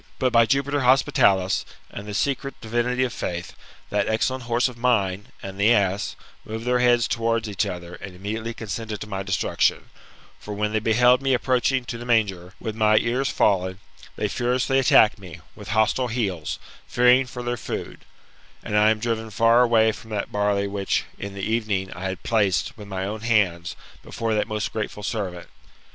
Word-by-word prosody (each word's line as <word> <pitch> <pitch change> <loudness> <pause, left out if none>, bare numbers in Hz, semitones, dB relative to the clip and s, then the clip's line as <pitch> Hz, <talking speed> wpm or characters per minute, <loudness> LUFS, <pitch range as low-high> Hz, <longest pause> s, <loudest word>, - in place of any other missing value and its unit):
But, 130 -1 0
by 115 -1 +5
Jupiter 140 +2 +1
Hospitalis, 125 -8 +3 0.3
and 100 - -8
the 105 - -5
secret 140 +3 -2
divinity 120 +3 0
of 125 - -2
faith, 85 -1 -4 0.4
that 105 0 +1
excellent 125 +3 0
horse 120 +2 +2
of 125 - -8
mine, 105 -5 0 0.2
and 95 0 -7
the 105 +3 +4
ass, 100 -3 +1 0.3
moved 110 +2 -6
their 125 0 +2
heads 120 -1 +4
towards 115 -1 0
each 100 -4 -1
other, 90 -1 -6
and 95 0 -9
immediately 110 +4 -4
consented 110 -1 -5
to 105 - -6
my 95 -2 -4
destruc 95 -1 -2
tion; - - +2 0.5
for, 105 - -7
when 105 +1 -1
they 110 - +2
beheld 125 +4 +4
me 135 -1 +2
approaching 130 +1 +1
to 120 -1 -5
the 120 - -7
manger, 100 -6 0
with 110 - -5
my 110 -1 +4
ears 125 +5 +1
fallen, 95 -2 +1 0.4
they - - -1
furiously 125 +2 +1
attacked 110 -5 +5
me, 90 -3 -10 0.2
with 105 -2 -11
hostile 110 +4 +1
heels, 100 -9 -2 0.3
fearing 125 +2 +4
for 125 0 -7
their 120 0 -1
food; 115 - -6 0.6
and 105 - -3
I 105 +1 +5
am 110 - +2
driven 110 0 -2
far 115 +2 +4
away 115 -2 +4
from 110 - -12
that 105 -2 -3
barley 105 -1 +1
which, 100 -1 -1 0.2
in 100 0 -6
the 100 - -6
evening, 105 -4 -1
I 90 +3 -7
had 95 -1 -4
placed, 100 -9 +1
with 105 -2 -11
my 95 -1 -3
own 105 +2 -5
hands, 100 -7 +1 0.3
before 115 -1 -3
that 105 - 0
most 105 -1 -3
grateful 105 -1 -4
servant. 95 -5 -4
110 Hz, 185 wpm, -24 LUFS, 100-120 Hz, 0.6 s, by